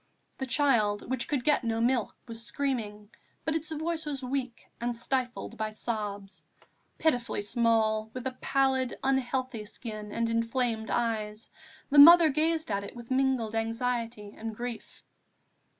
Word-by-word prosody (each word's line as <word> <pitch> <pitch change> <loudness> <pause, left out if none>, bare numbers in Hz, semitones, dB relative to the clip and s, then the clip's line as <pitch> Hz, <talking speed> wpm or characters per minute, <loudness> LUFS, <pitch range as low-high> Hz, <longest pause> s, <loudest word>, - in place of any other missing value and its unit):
The 265 - -2
child, 230 -6 +2
which 260 -2 -1
could 280 -5 -1
get 295 -1 +3
no 225 -1 -1
milk, 235 -1 +1
was 230 -1 -6
screaming, 225 -6 -3 0.3
but 315 - 0
its 320 0 -3
voice 320 +1 -2
was 285 -3 -4
weak 255 -2 -3 0.2
and 240 0 -2
stifled 250 +1 -2
by 220 - -1
its 215 0 -9
sobs. 205 -3 -4 0.6
Pitifully 245 -9 0
small, 220 -1 +1
with 255 +1 -7
a 260 - -1
pallid, 265 -2 +1
unhealthy 260 -3 0
skin 215 -1 -7
and 230 +1 0
inflamed 230 0 0
eyes, 220 -2 -2 0.4
the 290 - +6
mother 335 +2 +10
gazed 315 -1 0
at 200 0 -1
it 200 - -9
with 235 +1 -10
mingled 260 -4 +1
anxiety 230 -1 -2
and 225 0 -6
grief. 240 0 -7
240 Hz, 150 wpm, -29 LUFS, 220-265 Hz, 0.6 s, mother